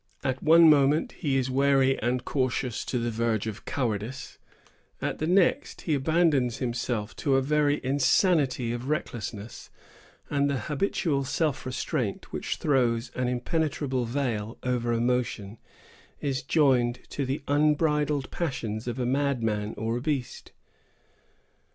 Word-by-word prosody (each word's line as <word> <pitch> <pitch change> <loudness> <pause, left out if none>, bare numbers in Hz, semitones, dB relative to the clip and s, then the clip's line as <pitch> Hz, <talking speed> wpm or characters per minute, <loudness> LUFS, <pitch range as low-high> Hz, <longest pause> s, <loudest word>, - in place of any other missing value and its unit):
At 130 0 -1
one 165 +1 +7
moment, 145 0 +4
he 140 -6 -1
is 130 0 0
wary 135 0 +3
and 125 +2 -1
cautious 130 -3 -1
to 125 - -2
the 120 0 -1
verge 115 -1 0
of 110 -1 -6
cowardice; 120 0 -3 0.6
at - - -3
the 155 - -1
next, 180 0 +2
he 160 - -1
abandons 145 -4 +2
himself 120 -3 -3
to 140 -2 +1
a 135 - +4
very 150 +1 +2
insanity 135 -2 +2
of 120 +3 -5
recklessness; 115 -8 -4 0.6
and 140 -1 +1
the 140 - 0
habitual 145 - -1
self 145 0 -1
restraint 125 - -3
which - - -2
throws 120 -4 +1
an 125 -1 -1
impenetrable 130 0 -1
veil 115 -4 -2
over 125 -2 0
emotion 115 -3 -1 0.6
is 135 -3 -2
joined 130 -4 +2
to 140 - -2
the 135 +2 -3
unbridled 150 -1 +1
passions 120 -9 -3
of 120 0 -3
a 125 - -1
madman 120 -6 0
or 115 +2 -1
a - - -4
beast. 140 -3 -3
130 Hz, 135 wpm, -27 LUFS, 120-145 Hz, 0.6 s, one